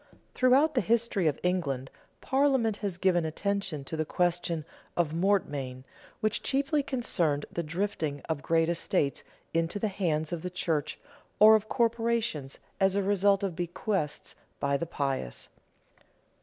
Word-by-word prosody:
Throughout 270 Hz, +5 st, +4 dB
the 250 Hz, -, +2 dB
history 230 Hz, -6 st, +1 dB
of 150 Hz, -, 0 dB
England, 140 Hz, -8 st, -1 dB, 0.3 s
Parliament 265 Hz, -6 st, +2 dB
has 200 Hz, -4 st, -3 dB
given 180 Hz, -2 st, +2 dB
attention 190 Hz, -1 st, -2 dB
to 150 Hz, -, -5 dB
the 155 Hz, -, 0 dB
question 170 Hz, -1 st, 0 dB, 0.3 s
of 165 Hz, -3 st, +1 dB
mortmain, 145 Hz, -9 st, 0 dB, 0.4 s
which 215 Hz, -1 st, 0 dB
chiefly 280 Hz, +2 st, +1 dB
concerned 175 Hz, -, 0 dB
the 170 Hz, -, -2 dB
drifting 160 Hz, -3 st, -2 dB
of 160 Hz, -3 st, -3 dB
great 165 Hz, +2 st, +2 dB
estates 165 Hz, -4 st, 0 dB, 0.3 s
into 165 Hz, +3 st, 0 dB
the 215 Hz, +1 st, 0 dB
hands 165 Hz, -5 st, -1 dB
of 170 Hz, -, -3 dB
the 180 Hz, -, -4 dB
church 165 Hz, -4 st, -2 dB, 0.4 s
or 215 Hz, +1 st, +9 dB
of 215 Hz, 0 st, +2 dB
corporations, 230 Hz, -, 0 dB, 0.2 s
as 195 Hz, -1 st, +3 dB
a 200 Hz, -, +1 dB
result 200 Hz, 0 st, +3 dB
of 190 Hz, -4 st, -2 dB
bequests 175 Hz, -2 st, -2 dB, 0.3 s
by 140 Hz, 0 st, +1 dB
the 170 Hz, +4 st, -2 dB
pious. 135 Hz, -, -3 dB
180 Hz, 140 wpm, -29 LUFS, 155-215 Hz, 0.4 s, or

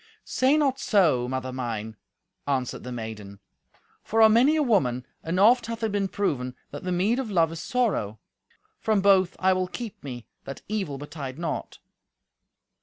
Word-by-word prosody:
"Say 265 Hz, +4 st, +2 dB
not 275 Hz, -3 st, +1 dB
so, 160 Hz, -, +3 dB
mother 130 Hz, 0 st, -3 dB
mine," 110 Hz, -4 st, -4 dB, 0.5 s
answered 130 Hz, -3 st, -1 dB
the 125 Hz, -, -7 dB
maiden, 110 Hz, -4 st, -7 dB, 0.6 s
"for 225 Hz, -, -1 dB
on 220 Hz, -1 st, +7 dB
many 260 Hz, +7 st, +5 dB
a 310 Hz, -, +2 dB
woman, 130 Hz, -, +1 dB, 0.2 s
and 170 Hz, +3 st, -2 dB
oft 230 Hz, +3 st, +5 dB
hath 230 Hz, 0 st, -5 dB
it 220 Hz, -, 0 dB
been 200 Hz, -1 st, 0 dB
proven, 130 Hz, -11 st, -2 dB, 0.2 s
that 145 Hz, -, -7 dB
the 180 Hz, -, -2 dB
meed 200 Hz, +8 st, +1 dB
of 260 Hz, -4 st, -3 dB
love 165 Hz, -5 st, +2 dB
is 165 Hz, 0 st, -6 dB
sorrow. 195 Hz, -, 0 dB, 0.6 s
From 215 Hz, -3 st, +1 dB
both 190 Hz, -2 st, +4 dB
I 190 Hz, 0 st, +3 dB
will 185 Hz, 0 st, -1 dB
keep 230 Hz, +2 st, -7 dB
me, 125 Hz, -4 st, -7 dB, 0.2 s
that 135 Hz, -, -8 dB
evil 195 Hz, -10 st, -2 dB
betide 145 Hz, -2 st, -7 dB
not." 165 Hz, -3 st, -4 dB
180 Hz, 170 wpm, -26 LUFS, 130-220 Hz, 0.6 s, on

